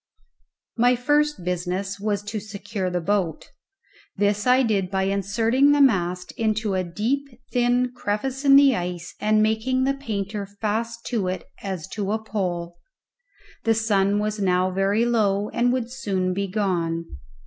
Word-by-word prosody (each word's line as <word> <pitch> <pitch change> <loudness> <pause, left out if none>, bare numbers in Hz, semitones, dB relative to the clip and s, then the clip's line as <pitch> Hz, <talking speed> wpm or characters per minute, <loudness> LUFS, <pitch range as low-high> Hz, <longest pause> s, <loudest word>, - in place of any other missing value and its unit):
My 245 +2 +4
first 295 -1 +1
business 180 +3 -2
was 205 -1 -1
to 210 +1 -4
secure 205 -1 -4
the 180 0 -1
boat; 180 -3 -1 0.7
this 205 +2 +1
I 255 +1 +5
did 200 -6 0
by 190 0 0
inserting 225 +8 +2
the 290 - +2
mast 180 -9 +2
into 220 -2 -1
a 185 -1 0
deep, 230 +11 -2 0.3
thin 245 0 +2
crevice 255 +7 -2
in 275 -1 +7
the 275 -2 +7
ice 175 -1 -4
and 215 0 +3
making 225 +4 +1
the 275 +1 +2
painter 210 -6 -4
fast 225 +3 -3
to 220 -7 -1
it 185 +1 -3 0.2
as 190 -4 -4
to 205 -1 -3
a - - +1
pole. 175 -5 -4 0.8
The 225 0 +3
sun 205 -2 +2
was 210 0 -1
now 185 -1 +2
very 195 +4 +1
low, 210 -4 +1
and 245 +1 +1
would 245 -2 -2
soon 195 -8 -1
be 200 +1 -2
gone. 175 -5 -1
205 Hz, 155 wpm, -24 LUFS, 190-235 Hz, 0.8 s, in